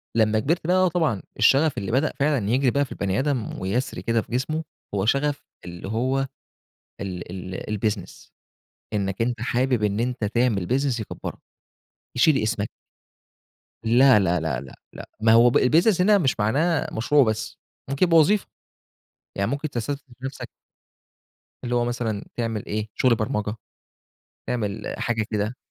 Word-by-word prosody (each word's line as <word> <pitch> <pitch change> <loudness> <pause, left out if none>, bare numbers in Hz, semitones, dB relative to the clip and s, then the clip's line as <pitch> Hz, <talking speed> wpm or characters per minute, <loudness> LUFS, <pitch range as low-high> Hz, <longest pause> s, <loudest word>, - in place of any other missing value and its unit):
لمّا 110 -1 +3
كبرت، 160 +8 -1
لأ، 185 +1 +4
طبعًا، 160 - 0 0.2
الشغف 145 +1 +4
اللي 100 +2 -3
بدأ 135 +6 +1
فعلًا 140 -8 +1
يجري 130 +2 +3
بقى 140 +2 +1
في - - -19
البني 95 0 -1
آدم 135 -5 -2
ويسري 105 +8 -2
كده 115 0 +1
في - - -15
جسمه، 155 +6 -1 0.3
هو 95 0 0
شغف 145 +4 +1 0.2
اللي 85 +1 -8
هو 130 +6 0 0.7
ال 90 -3 -5 0.2
ال 105 +1 -4
الBusiness. 105 -4 -3 0.6
إنك 100 0 -1
أنت 120 -1 -1
حابب 125 0 +1
إن 105 +1 +1
أنت 125 -1 -1
تعمل 105 -4 +1
business 130 -2 +1
يكبرك، 110 - -6 0.8
يشيل 135 +4 +4
اسمك. 105 -1 -1 1.1
لا، 120 +1 +6
لا، 90 -3 +1
لا، 75 -6 -2
لا، 70 - -11 0.2
لا. - - -10
ما 110 0 +5
هو 120 +1 +7
الbusiness 170 - +4
هنا 205 +2 +5
مش 135 - 0
معناه 145 +10 +1
مشروع 140 +6 +3
بس، 110 -2 -2 0.3
ممكن 140 +6 +2
يبقى 170 -2 +4
وظيفة. 195 +6 +4 0.9
يعني 100 +3 -1
ممكن 145 +2 -2
تستثمر 140 +2 -3 0.2
في 130 - -7
نفسك 135 - -6 1.2
اللي 120 0 -1
هو 120 0 +2
مثلًا 115 -4 -2
تعمل 115 -3 -2
إيه، 110 +1 -3
شغل 125 -2 +3
برمجة، 110 -2 -2 0.9
تعمل، 105 -3 -2
حاجة 115 -2 0
كده. 105 +3 -1
120 Hz, 150 wpm, -24 LUFS, 105-140 Hz, 1.2 s, هو